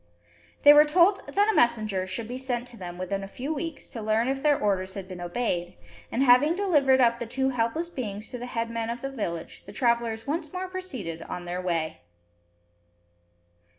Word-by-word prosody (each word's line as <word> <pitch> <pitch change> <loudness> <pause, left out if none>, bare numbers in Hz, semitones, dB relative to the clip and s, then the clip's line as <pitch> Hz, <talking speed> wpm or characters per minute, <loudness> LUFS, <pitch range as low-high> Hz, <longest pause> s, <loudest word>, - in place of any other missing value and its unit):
They 290 - +10
were 295 0 +9
told 350 +6 +3
that 405 +1 +2
a 440 - +3
messenger 215 -6 +2
should 200 +4 -4
be 250 +2 -5
sent 250 -2 -2
to 245 - -12
them 175 -4 -8
within 195 +2 -3
a - - -6
few 265 +9 -4
weeks, 320 0 -5
to 230 - -6
learn 220 +2 +1
if 270 0 -1
their 295 -1 +4
orders 190 -2 0
had 195 -2 -6
been 185 -2 -8
obeyed; 175 - -2 0.3
and, 255 - +1
having 275 +6 +5
delivered 295 -9 +3
up 235 -2 +4
the 235 - -4
two 265 +3 0
helpless 250 +7 -1
beings 215 -7 -5
to 245 - -6
the 245 - -6
headman 230 -1 -3
of 240 +1 -4
the 270 +1 -4
village, 170 -10 -5
the - - -8
travellers 235 0 0
once 310 +1 -3
more 370 +1 -4
proceeded 260 - -6
on 175 +1 -6
their 175 +1 -3
way. 165 - -2
235 Hz, 195 wpm, -27 LUFS, 195-275 Hz, 0.3 s, They